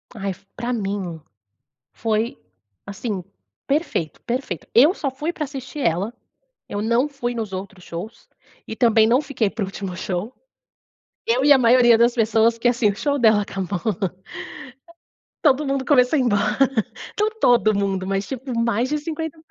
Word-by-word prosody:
Ai, 195 Hz, -2 st, -3 dB, 0.2 s
pra 245 Hz, +1 st, -2 dB
mim 195 Hz, -6 st, -3 dB, 0.7 s
foi, 225 Hz, +1 st, -1 dB, 0.5 s
assim, 200 Hz, -1 st, -4 dB, 0.4 s
perfeito 275 Hz, -, -1 dB
perfeito. 240 Hz, -, -4 dB
Eu 295 Hz, +10 st, +7 dB
só 280 Hz, -, -2 dB
fui 295 Hz, +6 st, -3 dB
para 305 Hz, -, -4 dB
assistir 275 Hz, +1 st, -8 dB
ela, 195 Hz, +2 st, 0 dB, 0.6 s
eu 205 Hz, -, -3 dB
não 235 Hz, +6 st, +2 dB
fui 260 Hz, -4 st, -4 dB
nos 220 Hz, -4 st, -4 dB
outros 190 Hz, 0 st, -7 dB
shows, 190 Hz, +8 st, -8 dB, 0.4 s
e 220 Hz, -, -6 dB
também 225 Hz, -2 st, +4 dB
não 245 Hz, +4 st, +4 dB
fiquei 255 Hz, -8 st, -1 dB
para 220 Hz, 0 st, -4 dB
o -, -, -3 dB
último 195 Hz, -1 st, -6 dB
show. 185 Hz, +5 st, -3 dB, 0.9 s
Eu 250 Hz, +4 st, +2 dB
e 290 Hz, -, +6 dB
a -, -, +6 dB
maioria 240 Hz, -1 st, +6 dB
das 235 Hz, +1 st, +4 dB
pessoas, 225 Hz, 0 st, +3 dB
porque, 230 Hz, +1 st, 0 dB
assim, 235 Hz, -3 st, +2 dB
o 200 Hz, -, -2 dB
show 285 Hz, +5 st, 0 dB
dela 220 Hz, -3 st, +5 dB
acabou, 195 Hz, -2 st, -3 dB, 1.6 s
todo 295 Hz, -1 st, +3 dB
mundo 275 Hz, -1 st, -1 dB
começou 260 Hz, +1 st, +4 dB
a -, -, +2 dB
ir 260 Hz, -, +2 dB
embora. 210 Hz, -2 st, +1 dB, 0.6 s
Não 425 Hz, +1 st, +3 dB
todo 235 Hz, -3 st, +4 dB
mundo, 195 Hz, -2 st, -1 dB
mas, 195 Hz, 0 st, -1 dB
tipo, 265 Hz, -1 st, -5 dB
mais 230 Hz, +1 st, +1 dB
de 300 Hz, -, 0 dB
cinquenta 320 Hz, +1 st, -5 dB
230 Hz, 165 wpm, -22 LUFS, 200-265 Hz, 1.6 s, Eu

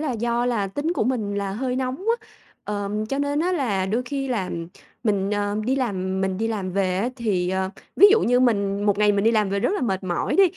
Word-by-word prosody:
là 300 Hz, -4 st, -1 dB
do 235 Hz, +1 st, 0 dB
là 225 Hz, -5 st, 0 dB
tính 290 Hz, -, -2 dB
của 335 Hz, -, 0 dB
mình 220 Hz, -5 st, -1 dB
là 200 Hz, -1 st, -2 dB
hơi 250 Hz, +4 st, -2 dB
nóng 260 Hz, 0 st, -1 dB, 0.2 s
á, -, -, -22 dB, 0.4 s
ờm, 210 Hz, +1 st, -2 dB
cho 275 Hz, +5 st, -2 dB
nên 285 Hz, +1 st, 0 dB
á 360 Hz, +2 st, +1 dB
là 210 Hz, -, 0 dB
đôi 225 Hz, +5 st, 0 dB
khi 270 Hz, +1 st, -3 dB
làm 185 Hz, -8 st, -2 dB, 0.4 s
mình, 200 Hz, -3 st, +1 dB
ờ, 205 Hz, 0 st, -1 dB
đi 260 Hz, +4 st, +1 dB
làm 190 Hz, -7 st, -1 dB
mình 190 Hz, 0 st, -1 dB
đi 225 Hz, -, 0 dB
làm 195 Hz, -5 st, -3 dB
về 185 Hz, -2 st, +1 dB
á 210 Hz, +6 st, 0 dB
thì, 195 Hz, -7 st, 0 dB
ờ, 190 Hz, 0 st, -1 dB, 0.3 s
ví 400 Hz, -, +9 dB
dụ 435 Hz, +2 st, +5 dB
như 245 Hz, -5 st, +3 dB
mình 200 Hz, -5 st, +1 dB
một 205 Hz, -1 st, +2 dB
ngày 210 Hz, 0 st, +4 dB
mình 200 Hz, 0 st, +1 dB
đi 225 Hz, -, +5 dB
làm 210 Hz, -3 st, +2 dB
về 200 Hz, 0 st, 0 dB
rất -, -, +1 dB
là -, -, -1 dB
mệt 190 Hz, -6 st, -1 dB
mỏi 175 Hz, -2 st, -1 dB
đi, 390 Hz, -, +7 dB
210 Hz, 250 wpm, -23 LUFS, 195-250 Hz, 0.4 s, ví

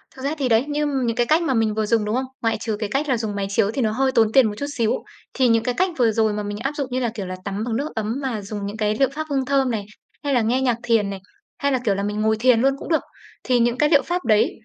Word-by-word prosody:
Thực 260 Hz, -, -11 dB
ra 285 Hz, -, 0 dB
thì 265 Hz, -3 st, 0 dB
đấy, 225 Hz, +3 st, +3 dB
như 295 Hz, 0 st, -1 dB, 0.2 s
những 230 Hz, -1 st, 0 dB
cái 240 Hz, -, +2 dB
cách 310 Hz, +6 st, +3 dB
mà 285 Hz, -5 st, +1 dB
mình 225 Hz, -3 st, +1 dB
vừa 215 Hz, 0 st, 0 dB
dùng, 220 Hz, -1 st, +1 dB
đúng 210 Hz, +2 st, -1 dB
không? 260 Hz, +1 st, 0 dB, 0.2 s
Ngoại 225 Hz, -1 st, +1 dB
trừ 220 Hz, -2 st, -2 dB
cái 210 Hz, -2 st, -3 dB
cách 280 Hz, +5 st, -1 dB
là 255 Hz, -, +2 dB
dùng 220 Hz, -2 st, -3 dB
máy 195 Hz, -1 st, -2 dB
chiếu 205 Hz, +1 st, +1 dB
thì 265 Hz, -, -2 dB
nó 220 Hz, -3 st, +1 dB
hơi 265 Hz, +4 st, +1 dB
tốn 225 Hz, -3 st, +3 dB
tiền 255 Hz, -2 st, +5 dB
một 210 Hz, -, -3 dB
chút 285 Hz, -, -3 dB
xíu, 225 Hz, -2 st, +2 dB, 0.4 s
thì 260 Hz, -2 st, +3 dB
những 230 Hz, -1 st, +3 dB
cái 250 Hz, -, 0 dB
cách 370 Hz, +1 st, +2 dB
vừa 235 Hz, -3 st, +3 dB
rồi 220 Hz, -1 st, +1 dB
mà 210 Hz, -, -3 dB
mình 205 Hz, 0 st, -4 dB
áp 270 Hz, +6 st, -2 dB
dụng, 280 Hz, -3 st, -2 dB
như 255 Hz, -, 0 dB
là, 240 Hz, -2 st, 0 dB
kiểu 200 Hz, -4 st, -4 dB
là, 185 Hz, 0 st, -5 dB
tắm 200 Hz, +2 st, -3 dB
bằng 230 Hz, -1 st, -2 dB
nước 285 Hz, +6 st, -2 dB
ấm 220 Hz, +1 st, -2 dB
mà 245 Hz, -6 st, -2 dB
dùng 200 Hz, 0 st, -5 dB
những 205 Hz, +2 st, -5 dB
cái 215 Hz, -1 st, 0 dB
liệu 270 Hz, +1 st, +2 dB
pháp 310 Hz, +2 st, -5 dB
hương 270 Hz, -2 st, 0 dB
thơm 270 Hz, -2 st, +2 dB
này, 205 Hz, -3 st, -3 dB, 0.4 s
hay 285 Hz, -1 st, 0 dB
là 245 Hz, -, +3 dB
nghe 245 Hz, +4 st, +1 dB
nhạc 245 Hz, -3 st, +1 dB
thiền 225 Hz, -4 st, +2 dB
này, 195 Hz, -, -5 dB, 0.4 s
hay 280 Hz, 0 st, 0 dB
là, 260 Hz, -, +1 dB
kiểu 200 Hz, -2 st, +2 dB
là, 200 Hz, -, -2 dB
mình 210 Hz, +1 st, -2 dB
ngồi 220 Hz, 0 st, +2 dB
thiền 240 Hz, -1 st, +4 dB
luôn 270 Hz, +1 st, +3 dB
cũng -, -, -9 dB
được. 320 Hz, -, +2 dB, 0.4 s
Thì 250 Hz, -1 st, +2 dB
những 240 Hz, +1 st, +2 dB
cái 300 Hz, +1 st, +3 dB
liệu 290 Hz, -3 st, +5 dB
pháp 355 Hz, +1 st, -2 dB
đấy 215 Hz, -2 st, +3 dB
230 Hz, 325 wpm, -22 LUFS, 215-265 Hz, 0.4 s, tiền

